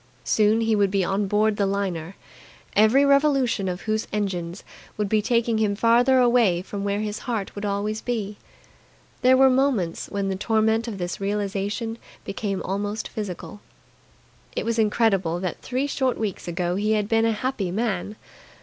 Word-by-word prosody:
Soon 215 +1 +3
he 225 -1 +2
would 200 -1 +3
be 195 0 +1
on 195 +3 0
board 210 +1 +2
the 200 - +1
liner, 195 -3 -3 0.6
every 220 +7 +5
revolution 275 -7 +3
of 180 0 -3
whose 215 0 -2
engines 185 -3 -3 0.3
would 210 -1 0
be 215 +1 +2
taking 230 0 +1
him 210 -2 +1
farther 240 +4 +4
away 235 -8 +3
from 200 +1 -5
where 200 +1 -1
his 210 0 -3
heart 220 -5 -2
would 205 0 -5
always 205 +2 -2
be. 210 -4 -3 0.8
There 260 +1 +5
were 265 0 +7
moments 255 -10 +1
when 200 -1 -2
the 190 - -1
torment 220 +3 +1
of 215 -4 -5
this 175 +1 -4
realization 205 +2 -2 0.3
became 195 -1 -3
almost 205 +3 -3
physical. 205 0 -6 0.9
It - - -2
was 230 0 0
incredible 200 -6 +2
that 185 -3 -4
three 260 +2 -2
short 265 -3 0
weeks 205 -5 -4
ago 175 +1 -1
he 210 +2 +1
had 210 -1 0
been 225 +1 +2
a 225 - +3
happy 215 -4 -2
man. 210 0 -2
210 Hz, 170 wpm, -24 LUFS, 195-230 Hz, 0.9 s, were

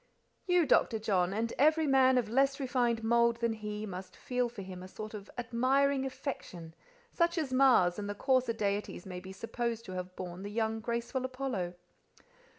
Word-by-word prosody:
"You, 360 -2 +4
Dr. 235 -4 +3
John, 190 -5 +1
and 225 +3 -1
every 310 +3 +4
man 260 -2 +5
of 240 -3 +1
a - - -9
less 275 +3 +2
refined 245 -4 0
mould 235 +1 +3
than 235 -1 0
he, 210 -1 -5
must 185 -2 -8
feel 250 -1 -1
for 220 -4 -8
him 185 -1 -8
a 185 - -8
sort 215 +3 -8
of 205 -1 -8
admiring 265 +3 +2
affection, 255 - -6 0.4
such 340 0 +1
as 290 -5 -1
Mars 245 -9 +5
and 205 0 -4
the 205 - -3
coarser 255 0 +2
deities 205 -4 -2
may 180 -1 -6
be 190 +1 -10
supposed 230 +3 -3
to - - -8
have 185 0 -5
borne 180 0 -6
the 200 - -5
young, 220 +1 -1
graceful 235 +3 -2
Apollo." 255 -9 -3
230 Hz, 185 wpm, -32 LUFS, 200-260 Hz, 0.4 s, man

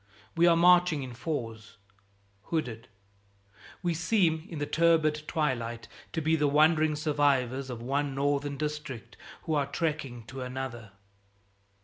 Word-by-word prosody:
We 170 +1 +5
are 170 - +6
marching 175 -3 +5
in 125 -2 -7
fours, 115 -5 -5 0.7
hooded. 125 -8 -3 1.0
We 175 -1 +1
seem 165 -1 +1
in 165 - -6
the 145 - -1
turbid 155 -1 +2
twilight 120 -7 -2 0.3
to 160 - -1
be 160 +1 +2
the 150 -2 +2
wandering 155 +1 +4
survivors 140 -4 +1
of 120 -2 -6
one 140 +2 -1
Northern 140 0 0
district 150 -6 -5 0.3
who 160 - -2
are 145 -2 +1
trekking 140 -5 -3
to 130 +3 -8
another. 125 -5 -6
145 Hz, 130 wpm, -29 LUFS, 130-160 Hz, 1.0 s, are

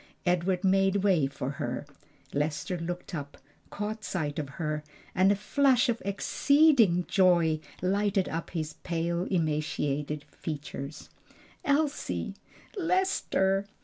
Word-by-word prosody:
Edward 180 +1 +1
made 195 0 +3
way 175 -9 +4
for 135 -1 -4
her. 120 +4 -3 0.5
Lester 150 +6 -1
looked 175 +2 -5
up, 145 -3 -5 0.3
caught 215 +1 -4
sight 155 -7 -2
of 145 -3 -4
her, 150 -2 -2 0.3
and 190 +2 +4
a - - +3
flash 250 +5 +3
of 235 -1 0
exceeding 225 - +4
joy 170 -4 +4 0.2
lighted 200 +1 +1
up 165 +1 -4
his 155 -3 -3
pale, 170 +1 -1
emaciated 150 -4 -1
features. 145 -1 -6 0.5
"Elsie!" 290 -1 0 0.4
"Lester!" 330 - +1
180 Hz, 115 wpm, -29 LUFS, 155-205 Hz, 0.5 s, way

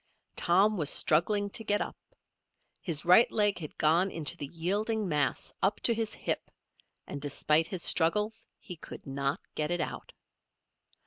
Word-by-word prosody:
Tom 195 +5 +2
was 150 -4 0
struggling 200 +6 +2
to 225 - -3
get 205 -1 +1
up. - - -4 0.9
His 165 -5 0
right 180 +7 +6
leg 205 -3 +1
had 155 -3 -9
gone 165 +5 +2
into 165 -1 +2
the 145 - -6
yielding 205 +7 -2
mass 150 -4 -1
up 200 +2 +1
to 235 - +5
his 225 -1 -2
hip, - - -3 0.6
and 140 - -7
despite 150 +2 +2
his 180 -3 -3
struggles 210 +7 +1
he 180 - -10
could - - -11
not 140 0 -2
get 150 0 -2
it 175 - -1
out. - - -5
175 Hz, 155 wpm, -29 LUFS, 155-210 Hz, 0.9 s, right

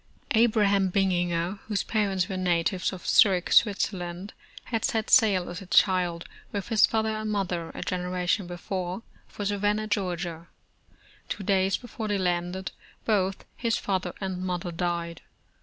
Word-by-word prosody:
Abraham 210 -4 +3
Bininger, 175 -1 0
whose 210 -3 0
parents 195 -4 0
were 190 - -4
natives 180 0 0
of 185 -2 -9
Zurich, 185 -4 +4
Switzerland, 190 -3 +1 0.3
had 225 -3 -3
set 220 -1 0
sail 200 -7 +5
as 175 +2 -6
a 190 - -10
child 180 -3 +2 0.2
with 200 0 -4
his 225 -2 +5
father 220 0 0
and 215 0 -3
mother, 180 -5 -2
a - - -4
generation 180 +1 -1
before, 180 +2 -4 0.2
for 205 - -6
Savannah, 205 +1 0
Georgia. 175 -5 -3 0.8
Two 205 - -4
days 190 0 +2
before 235 -3 -6
they 205 -1 0
landed, 180 0 -1 0.3
both 195 -3 0
his 230 -2 0
fath 190 -2 -1
er 175 - -7
and 190 -2 -3
mother 180 -1 -3
died. 170 -1 -3
190 Hz, 145 wpm, -27 LUFS, 175-205 Hz, 0.8 s, sail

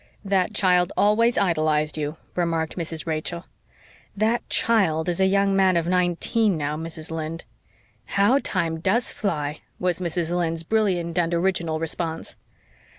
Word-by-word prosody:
"That 195 +1 +1
child 180 -2 +3
always 230 +3 +3
idolised 155 -4 +1
you," 150 +1 -3 0.2
remarked 165 -2 -1
Mrs. 165 -2 -4
Rachel. 165 +2 -3 0.7
"That 220 +3 +2
'child' 185 -9 +2
is 175 +2 0
a 190 - +5
young 195 0 +2
man 190 -2 +4
of 165 - 0
nineteen 180 +3 +1
now, 150 0 -2
Mrs. 160 0 -6
Lynde." 160 +1 -4 0.7
"How 230 +8 +5
time 165 -10 -1
does 205 +8 0
fly!" 150 -7 -2 0.2
was 180 -1 0
Mrs. 170 0 -1
Lynde's 165 -2 -1
brilliant 180 -4 0
and 170 0 +1
original 170 -3 0
response. 165 0 -3
175 Hz, 140 wpm, -24 LUFS, 160-195 Hz, 0.7 s, a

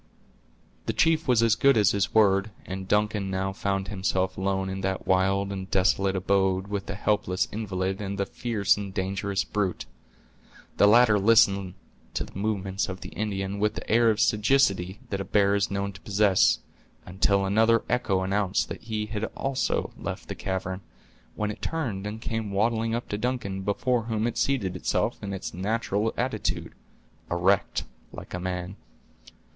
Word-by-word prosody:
The - - 0
chief 160 -1 +2
was 120 -3 +4
as 115 -2 +4
good 135 +3 +4
as 105 -3 +5
his 95 -6 0
word, 100 -1 +4 0.2
and 95 0 -6
Duncan 105 -1 +1
now 95 0 -2
found 95 0 -2
himself 95 -1 -1
alone 95 0 -1
in 95 0 -4
that 95 -1 -2
wild 95 +1 +2
and 95 -1 -5
desolate 95 +1 +2
abode 95 0 +1
with 100 -1 -3
the 95 - -4
helpless 100 -2 0
invalid 95 -2 -2
and 100 0 -4
the 100 - 0
fierce 105 -4 0
and 100 -1 -5
dangerous 95 0 -1
brute. 100 -4 -2 0.9
The 100 - +6
latter 110 -1 +6
listened 100 -3 +4 0.4
to - - 0
the - - -13
movements 100 -1 -2
of 95 0 -6
the - - -7
Indian 100 -2 -3
with 105 +1 +1
that - - -6
air 115 +1 +5
of 110 -1 +1
sagacity 105 -4 +2
that 100 -1 -1
a - - -2
bear 100 +1 +2
is 100 -1 +1
known 100 0 -2
to 90 - -13
possess, 100 -2 +3 0.5
until 100 +1 +1
another 115 +4 +3
echo 100 -6 +1
announced 95 0 0
that - - -6
he 110 -1 -3
had 105 0 -3
also 135 -1 -1
left - - -6
the - - -2
cavern, 95 0 -4 0.5
when 105 0 -1
it - - -10
turned 115 -12 -3
and 110 +2 -6
came 110 -2 -3
waddling 115 +3 +1
up 120 - -4
to 105 - -3
Duncan 115 -6 -2
before 115 +4 0
whom 110 -1 -1
it 120 - -1
seated 105 -10 0
itself 90 - -1
in 100 - -5
its 95 - -5
natural 105 +2 -1
attitude, - - -2 0.6
erect 90 +3 +1 0.3
like - - -10
a 90 - -3
man. 90 +1 -4
100 Hz, 170 wpm, -26 LUFS, 95-110 Hz, 0.9 s, The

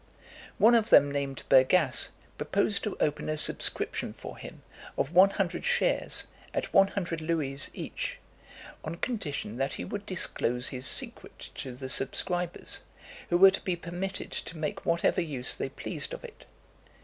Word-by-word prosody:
One 230 +3 +5
of 230 -1 +2
them 145 - +6
named 140 -1 -4
Bergasse, 130 +7 +4 0.3
proposed 205 - -1
to 210 - -4
open 150 0 -1
a 155 - -2
subscription - - +3
for - - -10
him, - - -12 0.3
of 145 - -2
one 185 +3 +7
hundred 195 -3 -3
shares, 485 0 +3 0.3
at - - -3
one 195 0 +6
hundred 175 -5 -4
louis 150 -4 0
each, - - -5 0.7
on 155 +2 -5
condition 150 - -4
that 135 +1 -2
he - - -6
would 205 +1 -7
disclose 125 -9 -1
his 130 0 0
secret - - -1
to 130 -2 -7
the 130 +1 -7
subscribers, 175 +7 +1 0.5
who 175 - +2
were 190 +1 +8
to 200 - -4
be 185 -3 -2
permitted 180 +3 -6
to 165 - -5
make 155 -1 -5
whatever 170 +2 +1
use 140 -7 +1
they - - -5
pleased - - -5
of - - -13
it. 485 -3 -13
170 Hz, 160 wpm, -28 LUFS, 140-195 Hz, 0.7 s, were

